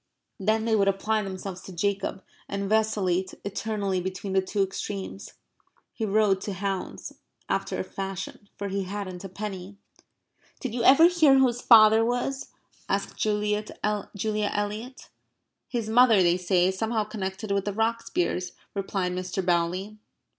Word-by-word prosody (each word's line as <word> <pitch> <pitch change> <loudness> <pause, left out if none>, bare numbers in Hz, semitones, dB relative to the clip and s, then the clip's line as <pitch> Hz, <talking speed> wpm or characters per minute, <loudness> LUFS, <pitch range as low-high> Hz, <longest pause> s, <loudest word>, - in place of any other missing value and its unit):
Then 220 +3 +1
they 225 -1 +2
would 200 -2 +3
apply 215 +3 +1
themselves 190 -1 -6
to - - -10
Jacob 195 +2 -2 0.3
and 200 0 -2
vacillate 200 -4 +1
eternally 200 -2 -2
between 190 +1 -4
the 190 - +4
two 195 +2 0
extremes. 190 - -5 0.6
He 220 - -3
rode 200 -2 +3
to 205 - -4
hounds 195 0 -4 0.3
after - - -1
a - - -1
fashion, 195 +1 -6
for 200 0 -4
he 195 0 -2
hadn't 185 -2 -5
a 195 - -6
penny. 195 0 -6 0.8
"Did 260 -5 -4
you 240 -1 -1
ever 280 +7 +8
hear 320 -6 +5
who 265 - +6
his 245 -1 -1
father 220 -1 +7
was?" 245 +3 -1 0.4
asked - - -1
Julia 210 0 +1 0.2
Eliot. 210 +3 -2 0.6
"His 235 -4 -3
mother, 225 -3 +6
they 175 0 +4
say, 180 0 +2
is 190 0 -4
somehow 220 -1 0
connected 200 0 -5
with 200 -1 0
the 205 - -1
Rocksbiers," 225 - -1 0.2
replied 195 -2 -2
Mr. 185 +1 -3
Bowley. 180 +4 0
200 Hz, 145 wpm, -26 LUFS, 190-220 Hz, 0.8 s, ever